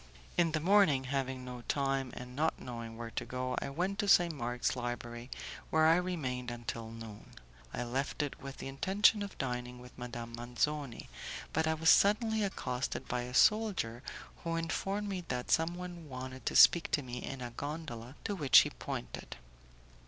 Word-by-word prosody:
In 165 -2 +3
the 155 - +2
morning, 170 -6 +5
having 130 -1 -2
no 125 -1 -7
money, 135 -2 0
and 125 0 -8
not 155 +3 +1
knowing 115 -2 -7
where 115 -1 -6
to - - -3
go, 130 0 -3
I - - -3
went 180 +8 -2
to 205 - +1
St. 175 -3 +6
Mark's 120 -3 -1
Library, 120 0 -5 0.4
where 160 0 +4
I 165 +1 +6
remained 135 -9 -2
until 115 -1 -5
noon. 115 -2 -10 0.4
I - - -3
left 135 +5 -1
it 145 - -5
with 135 0 -7
the - - -6
intention 195 +10 +3
of 200 -1 -5
dining 125 -1 -3
with 125 0 -13
Madame 120 -1 -6
Manzoni, 125 +2 -2 0.5
but 160 0 +2
I 160 - +2
was 160 +1 +5
suddenly 215 +2 +4
accosted 130 -10 -2
by 125 0 -1
a 125 +1 -6
soldier 200 - +3 0.4
who 165 0 -1
informed 195 +5 -1
me 190 -3 -3
that 125 -1 -3
someone 175 0 -1
wanted 130 -1 -7
to - - 0
speak 170 - +8
to 145 - +2
me 125 -1 -6
in 135 - -5
a 120 - -5
gondola 140 -3 -6
to 205 - -1
which 150 -9 +6
he - - -2
pointed. - - -6
135 Hz, 175 wpm, -33 LUFS, 125-165 Hz, 0.5 s, speak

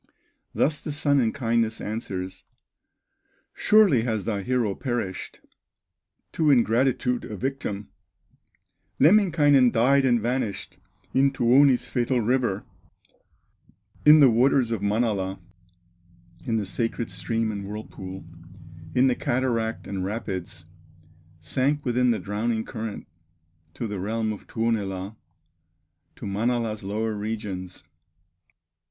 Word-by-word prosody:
Thus 150 +1 +1
the 155 - -5
Sun 145 -1 +2
in 115 -3 +2
kindness 115 -3 0
answers: 95 -4 -5 1.1
"Surely 210 - +4
has 110 -4 -2
thy 105 -3 -1
hero 120 -1 0
perished, 120 -6 -4 0.9
To 155 -2 +1
ingratitude 125 0 +2
a 105 - -7
victim; 120 -5 -4 1.1
Lemminkainen 150 -7 +5
died 135 +5 +3
and 120 -3 +3
vanished 115 -3 -3 0.3
In 135 +1 +4
Tuoni's 130 0 +4
fatal 125 0 0
river, 120 -3 0 1.4
In 150 0 +8
the 135 - +8
waters 125 +1 +3
of 115 -4 -2
Manala, 100 -2 0 1.1
In 115 - 0
the 105 - -1
sacred 115 +4 -2
stream 115 +4 -2
and 100 -1 -5
whirlpool, 95 -3 -8 0.7
In 125 - +5
the 130 - +4
cataract 120 -3 -1
and 95 -2 -4
rapids, 95 -5 -5 0.8
Sank 140 - -1
within 125 0 +2
the 115 - +2
drowning 110 +3 -2
current 110 -3 -6 0.7
To 120 - -4
the 105 -3 -4
realm 110 +3 -1
of 105 - -12
Tuonela, 105 -3 -2 1.0
To - - -9
Manala's 110 +1 -1
lower 110 +3 -2
regions." 105 -4 -5
115 Hz, 110 wpm, -25 LUFS, 105-130 Hz, 1.4 s, In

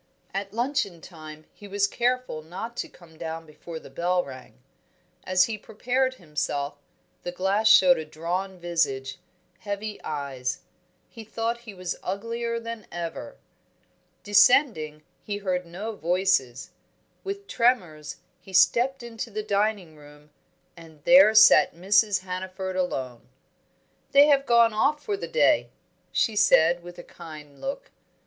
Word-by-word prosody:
At 195 0 -4
luncheon 230 - -1
time 155 -2 -12
he 205 - -13
was 200 0 +1
careful 245 -5 -1
not 190 +9 -7
to - - -4
come 165 -3 -19
down 165 0 -5
before 160 +2 -10
the - - -14
bell 180 +4 0
rang. 130 -2 -11 0.7
As 185 0 +4
he 215 +1 -3
prepared 255 +5 -1
himself, 150 - -3 0.5
the 175 - -5
glass 195 +4 +1
showed 180 -5 +7
a - - -4
drawn 180 +5 -4
visage, 145 -6 -2 0.4
heavy 205 0 -5
eyes; 135 -4 -4 0.5
he 225 - -11
thought 230 +2 -3
he 200 - -9
was 180 -1 -4
uglier 230 +4 -3
than 230 -2 -8
ever. 170 -1 -6 0.9
Descending, 200 - +3 0.2
he 205 -1 -4
heard 180 -3 -2
no 205 +6 -6
voices. 175 -9 0 0.5
With 400 +1 -5
tremors 180 - 0 0.2
he 190 +1 -15
stepped 240 +8 +3
into 235 0 -6
the 215 0 -4
dining 205 -5 -1
room, 150 0 -17 0.4
and 160 -3 -15
there 260 - +7
sat 215 - +7
Mrs. 200 +2 +2
Hannaford 185 0 -5
alone. 130 -10 -3 0.8
"They 285 +1 +8
have 275 -1 +3
gone 235 -1 +5
off 295 +7 +1
for 415 - -2
the 400 - -6
day," 485 - +2 0.4
she 220 - +1
said, 170 -3 +4
with 175 0 -11
a 175 - -9
kind 150 -4 -12
look. 390 - -5
190 Hz, 140 wpm, -25 LUFS, 160-225 Hz, 0.9 s, They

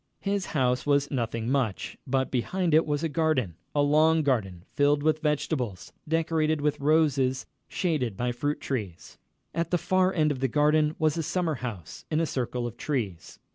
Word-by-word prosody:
His 200 -2 -1
house 125 -4 +1
was 145 -1 +1
nothing 115 -3 -2
much, 125 -6 -1
but 130 0 0
behind 170 +7 0
it 160 +1 +4
was 145 +1 -1
a - - +2
garden 155 - 0 0.2
a 145 - +3
long 155 +2 +4
garden, 100 -11 -1
filled 145 0 +2
with 155 0 +2
vegetables, 140 - -2
decorated 160 -1 +1
with 150 0 0
roses, 140 -4 +2 0.2
shaded 135 - -1
by 125 0 0
fruit 145 +5 -2
trees. 105 -11 -5 0.3
At 170 +1 -1
the 175 - +2
far 185 +2 +2
end 155 -4 +2
of 135 - -3
the 135 - +1
garden 150 +3 +2
was 155 -2 +1
a - - 0
summer 170 +1 -1
house, 105 -10 -7
in 155 - +1
a 165 - +2
circle 125 -4 -2
of 120 - -6
trees. 105 - -3
145 Hz, 175 wpm, -27 LUFS, 125-155 Hz, 0.3 s, it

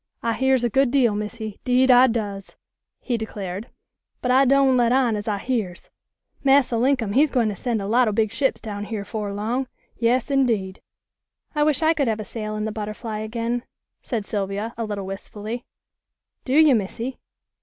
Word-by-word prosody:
"I 230 0 +1
hears 265 0 +2
a 240 - +2
good 270 +3 +3
deal, 245 -5 +3
Missy, 210 0 -5
'deed 255 +1 +4
I 250 +1 +7
does," 205 -4 -4 0.5
he 245 -3 -1
declared, 205 -1 -6 0.5
"but 250 - 0
I 265 +2 +5
doan' 270 0 +4
let 240 -1 +3
on 250 -3 +3
as 205 +1 -5
I 210 -2 0
hears. 205 -6 -3 0.5
Massa 270 -3 +4
Linkum 240 -4 +1
he's 290 +5 +4
gwine 240 -5 +1
to 205 - -4
send 225 0 -2
a - - -4
lot 240 +4 +3
o' - - +2
big 215 0 +1
ships 265 +4 0
down 205 -2 -5
here 210 -2 -4
'fore 210 -2 -4
long. 230 +6 -2 0.3
Yas, 245 +3 +1
indeed." 225 -9 +1 0.7
"I 300 - 0
wish 300 0 +2
I 320 +1 +5
could 290 -5 0
have 220 -1 0
a - - -3
sail 215 +1 -5
in 215 0 -2
the 220 - -2
Butterfly 215 +1 -5
again," 230 +2 -2 0.4
said 225 -6 -3
Sylvia, 205 +2 -3
a 230 - -3
little 205 -2 -4
wistfully. 210 +4 -6 0.8
"Do 255 - -1
you, 305 -1 +6
Missy? 230 +4 -2
230 Hz, 185 wpm, -23 LUFS, 210-255 Hz, 0.8 s, I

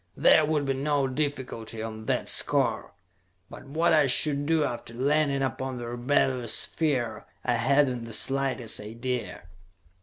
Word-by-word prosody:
There 155 - +5
would 150 -2 0
be 135 - 0
no 140 0 0
difficulty 130 -5 -4
on 110 -1 -7
that - - -1
score. - - +1 0.6
But - - -11
what 160 +5 +1
I 150 -3 +4
should 145 +2 +2
do 160 -1 +2
after 120 -4 -5
landing 140 +1 +1
upon 130 0 -3
the 120 -1 -6
rebellious 125 -1 +1
sphere, 125 -9 0 0.2
I 125 - +1
had 135 +5 +3
not 125 -2 -4
the 115 - -7
slightest 135 -2 -1
idea. 115 +3 -5
130 Hz, 150 wpm, -27 LUFS, 120-145 Hz, 0.6 s, There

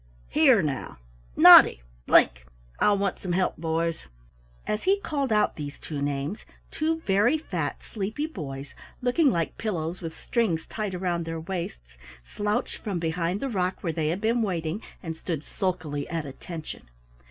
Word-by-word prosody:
Here, 265 - +5
now, 145 -3 -3 0.4
Noddy - - +9 0.2
Blink! - - +4 0.3
I'll 205 -1 +4
want 195 -1 -1
some 180 -2 -3
help, 185 +1 +1
boys." 165 +1 -2 0.6
As 210 - -2
he 390 +2 +4
called 280 - -2
out 210 -1 +2
these 145 -1 -6
two 150 -3 -5
names, 145 +7 -2 0.3
two 320 +1 -1
very 210 +6 +3
fat, 170 - -4
sleepy 220 +7 -3
boys, 140 - -7 0.3
looking 270 +5 +4
like 170 -8 -1
pillows 175 -5 -3
with 165 -2 -7
strings 205 -10 0
tied 205 -5 -4
round 175 -2 -1
their 165 0 -4
waists, 110 - -6 0.2
slouched 205 - -2
from 200 -4 -3
behind 170 +3 -1
the 275 - -1
rock 185 -4 -1
where 165 -3 -1
they 155 -1 -1
had 175 +5 -1
been 230 +2 +2
waiting, 175 -2 -2 0.2
and 165 -2 -4
stood 160 -2 -4
sulkily 160 -7 -3
at 165 -3 -3
attention. 150 - -8
175 Hz, 155 wpm, -26 LUFS, 160-210 Hz, 0.6 s, Noddy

